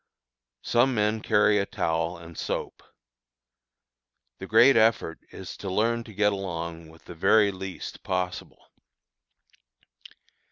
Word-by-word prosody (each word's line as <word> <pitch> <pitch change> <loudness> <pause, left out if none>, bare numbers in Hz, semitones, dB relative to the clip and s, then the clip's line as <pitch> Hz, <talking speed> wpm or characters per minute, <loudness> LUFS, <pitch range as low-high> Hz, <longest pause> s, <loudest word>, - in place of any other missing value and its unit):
Some 125 +2 +2
men 105 +1 0
carry 105 -1 +3
a 100 - -1
towel 80 +1 -2
and 85 0 -12
soap. - - -4 1.6
The - - -7
great 135 +3 +6
effort 110 -7 +2
is - - -9
to 95 - -6
learn 115 +5 0
to 110 - -12
get 105 0 +2
along 85 -4 -5
with 80 0 -19
the - - -9
very 100 +4 +3
least 95 -1 -8
possible. 90 -1 -4
95 Hz, 120 wpm, -26 LUFS, 85-110 Hz, 1.6 s, great